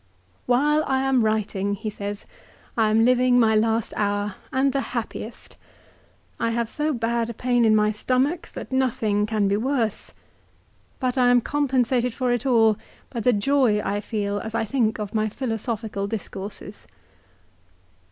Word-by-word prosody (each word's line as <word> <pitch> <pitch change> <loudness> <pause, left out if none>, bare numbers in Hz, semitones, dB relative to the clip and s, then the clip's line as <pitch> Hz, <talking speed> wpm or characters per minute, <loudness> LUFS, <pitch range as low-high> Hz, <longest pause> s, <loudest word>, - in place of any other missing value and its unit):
" 90 - -37
While 295 +5 +3
I 265 -1 +1
am 265 -3 +2
writing," 205 -2 0
he 215 +2 -5
says, 205 0 -6 0.2
" - - -29
I 220 -2 +3
am 225 +1 +4
living 250 0 +4
my 220 -2 +4
last 225 +1 +1
hour, 205 -1 -1 0.2
and 265 0 +2
the 275 - +1 0.2
happiest. 225 0 -6 0.8
I 230 - +1
have 230 0 -1
so 300 +1 0
bad 235 -2 -1
a 235 - -6
pain 245 0 +2
in 215 -1 +5
my 210 0 +3
stomach 260 +9 0
that - - -7
nothing 230 -6 +1
can 215 -2 +1
be 200 +1 +1
worse. 235 -2 -1 0.9
But 255 0 0
I 245 -1 +5
am 245 0 +6
compensated 255 -3 0
for 250 -1 0
it 245 +2 -2
all 225 -4 +4 0.3
by 240 - -4
the 245 +3 +3
joy 235 0 +2
I 205 0 -2
feel 205 -1 -2
as 220 +1 -6
I 225 - 0
think 220 -1 0
of 210 -2 -5
my 215 0 +1
philosophical 225 -3 -3
discourses." 200 -1 -6
225 Hz, 165 wpm, -24 LUFS, 210-255 Hz, 0.9 s, am